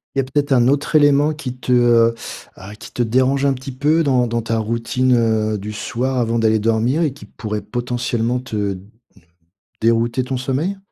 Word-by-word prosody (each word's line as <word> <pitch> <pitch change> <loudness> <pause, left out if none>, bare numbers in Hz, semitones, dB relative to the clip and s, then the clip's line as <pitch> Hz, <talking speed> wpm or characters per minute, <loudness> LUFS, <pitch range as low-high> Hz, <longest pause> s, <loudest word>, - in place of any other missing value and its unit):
Il - - +1
y - - +5
a - - -3
peut-être 145 +2 -1
un 125 -2 +4
autre 145 +3 0
élément 145 +1 +4
qui 140 -5 -6
te, 125 - -4
heu 120 -2 +4 0.4
ah, 100 +3 -11
qui - - -12
te - - -3
dérange 130 +4 +2
un 140 - +3
petit 130 +1 -7
peu 150 +5 +1
dans 130 -4 +2
dans 115 0 -1
ta 115 0 -2
routine, 115 +3 0
heu, 110 -2 +1
du 105 +2 -6
soir, 130 +4 -3
avant 115 -1 0
d'aller 110 -1 +2
dormir 115 +7 +1
et 155 -5 0
qui 140 - -13
pourrait 105 -2 -5
potentiellement 120 +1 -2
te, 105 -6 -3 1.0
dérouter 115 +3 +1
ton 130 0 -3
sommeil? 140 +10 -2
125 Hz, 190 wpm, -19 LUFS, 115-135 Hz, 1.0 s, y